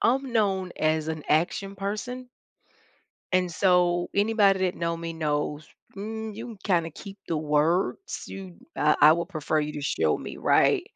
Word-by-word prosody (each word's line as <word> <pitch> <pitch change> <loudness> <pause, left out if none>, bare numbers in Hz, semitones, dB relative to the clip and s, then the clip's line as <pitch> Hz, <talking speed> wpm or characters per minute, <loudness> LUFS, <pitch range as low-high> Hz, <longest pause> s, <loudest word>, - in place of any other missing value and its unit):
I'm 265 +1 +1
known 195 -5 +1
as 155 0 +1
an 160 -2 -4
action 195 +5 0
person. 215 +6 -4 1.0
And 180 -1 +2
so, 175 -1 +2
anybody 205 -2 +3
that 185 -1 +1
know 170 0 -2
me 165 0 -5
knows, 150 -1 -2 0.3
mm, 220 +2 -5
you 230 +3 -7
can 230 -3 -9
kinda 170 -4 +1
keep 195 +6 -11
the 165 - 0
words, 155 - 0
you 190 -3 -9 0.2
uh, 150 +1 +3
I 150 +1 +9
would 170 +1 -2
prefer 155 0 -1
you 150 0 -3
to 145 - -5
show 80 - +1
me, - - -8
right, - - +3
180 Hz, 165 wpm, -26 LUFS, 155-200 Hz, 1.0 s, I